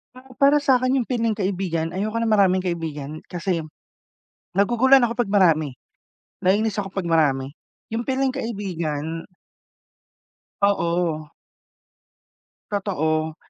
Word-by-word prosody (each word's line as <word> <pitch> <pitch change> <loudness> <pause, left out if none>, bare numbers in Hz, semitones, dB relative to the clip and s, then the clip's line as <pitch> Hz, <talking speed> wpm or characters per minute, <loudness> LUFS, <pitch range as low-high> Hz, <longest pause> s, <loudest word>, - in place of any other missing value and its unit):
Ah, 255 +1 -15
para 285 +1 +5
sa'kin 255 -2 +3
yung - - -7
piling-kaibigan, 195 -8 -1
ayoko 215 +5 -2
ng 230 - 0
maraming 195 -3 +4
kaibigan 155 -4 -4
kasi 175 -2 -2 0.9
naguguluhan 240 +7 +5
ako 235 0 0
'pag 225 -5 0
marami. 160 -8 +3 0.7
Nainis 210 +3 +1
ako 195 - -5
pag 195 -1 -4
marami. 145 -5 +1 0.4
Yung 230 +3 -3
piling-kaibigan 195 - -2 1.4
Oo. 170 -5 +1 1.5
Totoo. 160 -6 -1
195 Hz, 100 wpm, -23 LUFS, 165-230 Hz, 1.5 s, para